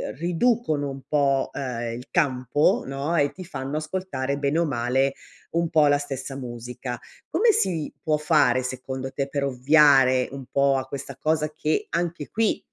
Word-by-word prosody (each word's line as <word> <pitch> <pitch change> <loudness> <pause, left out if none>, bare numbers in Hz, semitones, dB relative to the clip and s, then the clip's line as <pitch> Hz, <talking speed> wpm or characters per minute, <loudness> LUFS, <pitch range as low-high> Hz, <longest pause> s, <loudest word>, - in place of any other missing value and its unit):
ehm, - - -5
riducono 170 - +1
un 135 0 -8
po,' 140 -2 +2
ehm, 120 -3 -4
il 125 +2 -8
campo, 140 -2 +2
no, 140 +5 -2
e 145 -3 +3
ti 185 - -9
fanno 140 -4 -5
ascoltare 155 -4 -3
bene 140 +2 0
o 170 - +3
male 130 +1 +1 0.4
un 170 0 +1
po' 155 -3 +5
la 145 0 +4
stessa 135 -1 -5
musica. 120 0 -6 0.3
Come 445 +6 +4
si 175 - 0
può 155 -1 +1
fare, 150 -5 +3
secondo 130 +1 -5
te, 140 0 -2
per 140 0 -2
ovviare 135 -1 +5
un 135 -1 -7
po' 140 0 +3
a 130 - -4
questa 140 -1 -7
cosa 155 +1 0
che 155 +1 -1
anche 170 -3 -2
qui, 225 -1 0
140 Hz, 170 wpm, -24 LUFS, 130-155 Hz, 0.4 s, po